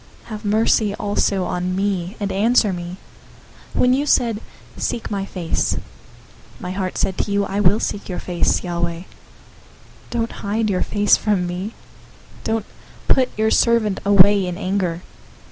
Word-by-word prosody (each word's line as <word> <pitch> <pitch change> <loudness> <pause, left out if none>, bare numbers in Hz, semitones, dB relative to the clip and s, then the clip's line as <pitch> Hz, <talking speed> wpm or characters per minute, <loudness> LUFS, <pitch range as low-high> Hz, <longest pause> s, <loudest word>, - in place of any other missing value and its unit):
Have 215 -1 -8
mercy 210 0 +2
also 200 -2 0
on 180 +1 -2
me, 190 -1 -1
and 200 -1 -2
answer 210 0 +3
me. 175 +1 -6 0.8
027:008 - - -1
When 250 0 +5
you 285 +3 0
said, 230 -5 +2 0.3
"Seek 230 - -3
my 195 -1 -2
face," 175 -4 -1 0.8
my 180 - -5
heart 185 -1 -3
said 190 - -1
to - - -1
you, 200 0 +2
"I 200 - -2
will 205 +2 +4
seek 205 - -3
your 180 - -3
face, 175 -2 0
Yahweh." 170 -1 -2
027:009 - - -13 1.0
Don't 230 -1 -1
hide 215 +1 -1
your 185 - 0
face 205 -1 +3
from 205 -4 0
me. 180 +5 -4 0.7
Don't 225 -1 -1 0.4
put 255 -1 +4
your 220 0 +2
servant 230 -4 +3
away 200 -1 +6
in 175 -1 -4
anger. 185 -3 -1
200 Hz, 155 wpm, -21 LUFS, 180-215 Hz, 1.0 s, away